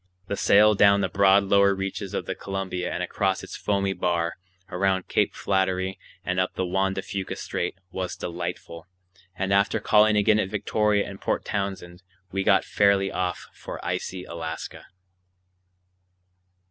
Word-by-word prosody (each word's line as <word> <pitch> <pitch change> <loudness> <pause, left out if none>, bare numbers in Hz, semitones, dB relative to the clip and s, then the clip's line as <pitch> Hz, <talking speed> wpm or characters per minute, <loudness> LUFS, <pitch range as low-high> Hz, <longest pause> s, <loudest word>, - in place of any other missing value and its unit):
The 100 - -3
sail 105 +2 +5
down 100 0 +5
the - - 0
broad 100 0 +4
lower 100 0 +4
reaches 95 0 -4
of - - -2
the - - -3
Columbia 95 -2 -4
and 90 - -2
across 95 +1 -1
its - - -8
foamy 100 -1 0
bar, 85 -2 -1 0.3
around 95 0 0
Cape - - +1
Flattery, 95 -1 0 0.3
and 90 0 0
up 90 - -1
the 95 - -1
Juan 95 +2 0
de 95 - -3
Fuca 100 -2 -4
Strait, 85 - -3 0.2
was 95 -1 -4
delightful; 85 -1 -6 0.5
and 95 0 -1
after 100 +3 +2
calling 105 0 +4
again 105 +1 +4
at 95 - -1
Victoria 105 0 +1
and 100 0 -9
Port - - -1
Townsend 95 -3 -4 0.3
we 95 0 -1
got 95 0 +4
fairly 100 -1 +2
off 90 -2 -2
for - - -8
icy 95 -1 -3
Alaska. 80 -2 -7
95 Hz, 155 wpm, -25 LUFS, 90-100 Hz, 0.5 s, sail